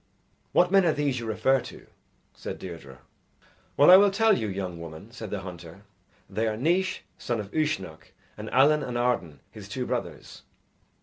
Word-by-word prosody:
"What 180 0 +3
men 195 -1 +5
are 165 -3 +3
these 140 -4 -1
you 115 - -6
refer 130 +5 +2
to?" - - -11 0.5
said - - -7
Deirdre. 70 -8 -10 0.8
"Well, 145 +5 +7
I 185 - +11
will 200 +1 +6
tell 215 +2 +3
you, 110 - -2
young 95 -3 -5
woman," 85 +6 -10
said 115 -3 -8
the 100 -1 -4
hunter, 90 0 -10 0.4
"They 110 +4 -2
are 110 -1 -2
Naois, 185 +8 0 0.2
son 120 -2 -2
of 100 -1 -7
Uisnech, 95 - -2 0.2
and - - -7
Allen 150 +4 +4
and 125 -3 -4
Arden 120 - -1
his - - -11
two - - -3
brothers." - - -5
115 Hz, 175 wpm, -26 LUFS, 95-155 Hz, 0.8 s, I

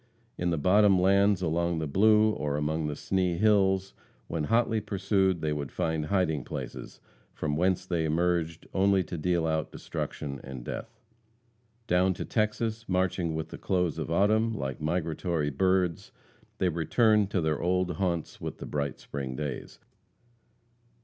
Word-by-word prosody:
In 90 - -1
the 85 - 0
bottom 95 +4 +4
lands 100 +1 +3
along 85 +1 0
the 80 - -1
Blue, 105 +7 +4
or 75 -7 -2
among 75 +1 -1
the 75 - -3
Sni 90 +1 0
hills, 95 -2 +3 0.3
when 80 -2 -2
hotly 115 +2 +2
pursued, 95 -3 +1
they 75 -1 0
would 70 -2 -4
find 80 -2 -1
hiding 80 -8 +1
places, - - -7 0.4
from 75 -1 -2
whence 90 +3 +1
they 85 -3 -1
emerged 85 +1 0
only 95 0 +3
to 85 - -6
deal 85 +1 0
out 80 -1 -1
destruction 70 -3 -5
and 65 -3 -8
death. - - -7 0.9
Down 90 0 +2
to - - -5
Texas, 110 0 -1
marching 90 -3 0
with 80 0 -4
the - - -9
close 90 -4 0
of 80 - -4
autumn, 110 +5 +2
like 65 +2 -4
migratory 80 -1 -1
birds, 90 +2 +1 0.5
they 95 - +2
returned 105 +5 +2
to 100 - 0
their 80 -2 0
old 90 -1 0
haunts 85 -4 -2
with - - -5
the - - -7
bright 70 -1 -3
spring 65 -2 -5
days. 75 -2 -5
90 Hz, 155 wpm, -28 LUFS, 80-95 Hz, 0.9 s, bottom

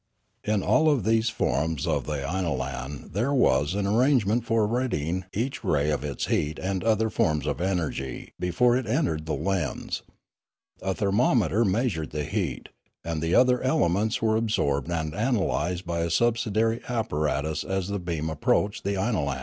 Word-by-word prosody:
In 105 -2 0
all 155 0 +4
of 140 -8 +2
these 110 +2 +2
forms 80 - -1
of 75 -6 -1
the 75 -2 -2
inolan 70 -5 -3
there 115 +9 0
was 75 - +3
an 100 -1 0
ar 105 +4 +2
rangement 120 -4 +3
for 115 -2 +2
ridding 95 - -1
each 125 +6 -3
ray 75 0 +1
of 75 -2 -1
its 70 -4 -3
heat 75 +1 0
and 95 0 -2
of 115 - 0
other 110 0 +2
forms 75 -7 +1
of - - -2
energy 85 -8 -3
before 105 +8 +2
it 130 -1 -1
entered 110 - 0
the 80 - 0
lens; 90 +2 -2 0.8
a 95 0 -1
thermometer 105 +1 +2
measured 100 - 0
the 75 0 -3
heat; 90 - -3 0.3
and 80 -1 -3
the 80 +2 +1
other 125 -1 +4
elements 110 -3 +1
were 110 -1 +3
ab 115 +1 0
sorbed 70 - 0
and 80 -3 -2
analysed 95 -5 0
by 85 -1 -2
a 85 0 0
subsidiary 115 +2 +1
apparatus 75 - -1
as 95 -1 -2
the 100 0 -2
beam 85 -3 -3
approached 90 +6 0
the 100 +1 -1
inolan. 80 - -1
95 Hz, 170 wpm, -26 LUFS, 80-110 Hz, 0.8 s, all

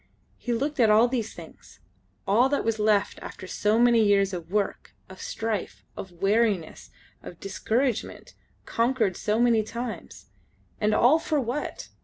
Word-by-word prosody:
He 245 - -4
looked 275 +5 -2
at 225 -3 +5
all 220 +3 +5
these 235 -3 -3
things, 165 -2 -14 0.5
all 235 +7 +3
that 285 - 0
was 225 -1 0
left 210 -1 +1
after - - -9
so 210 +3 0
many 235 -1 +5
years 200 -2 +3
of 170 -2 -6
work, 205 -1 -2
of 190 0 -12
strife, 220 -3 -4
of 190 - -8
weariness, 195 -1 0 0.3
of 175 - -11
discouragement, 225 +5 -2 0.3
conquered 230 -5 0
so 210 +4 -1
many 235 -2 +4
times. 235 +2 -7 0.5
And 210 0 +1
all 265 +9 +5
for 310 -2 -1
what? 255 +3 -4
220 Hz, 150 wpm, -26 LUFS, 200-240 Hz, 0.5 s, at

